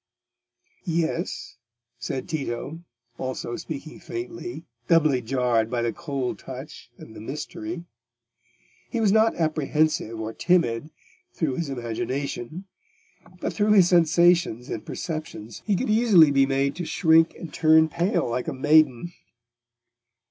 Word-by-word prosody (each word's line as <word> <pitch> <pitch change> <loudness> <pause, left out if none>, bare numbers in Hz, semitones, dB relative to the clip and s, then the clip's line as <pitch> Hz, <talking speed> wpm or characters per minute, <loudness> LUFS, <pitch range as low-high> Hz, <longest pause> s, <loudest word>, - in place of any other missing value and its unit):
"Yes," 165 -4 -2 0.4
said 125 +2 -4
Tito, 140 +1 -4 0.4
also 130 -2 -4
speaking 155 +2 -7
faintly, 355 - -6 0.2
doubly 155 -6 +4
jarred 120 -2 +1
by 120 -1 -1
the 115 - -1
cold 140 -6 -4
touch 130 0 -9
and 110 - -13
the - - -9
mystery. 160 +7 -6 1.1
He 235 - -2
was 215 -3 +3
not 220 +2 +4
apprehensive 155 -6 0
or 110 0 -4
timid 155 -6 +1 0.5
through 145 -6 -1
his 165 -4 -2
imagination, 130 - -4 0.7
but - - -3
through 210 0 +3
his 185 -4 +6
sensations 170 -7 +3
and 110 - -4
perceptions 155 - -6
he 205 - +3
could 220 +3 -1
easily 210 -9 +6
be 135 -1 +4
made 135 0 0
to 180 - -3
shrink 160 0 +3
and 165 - -9
turn 160 0 +5
pale 175 - 0
like 125 +1 -2
a - - -2
maiden. 150 +2 +3
155 Hz, 125 wpm, -25 LUFS, 125-170 Hz, 1.1 s, his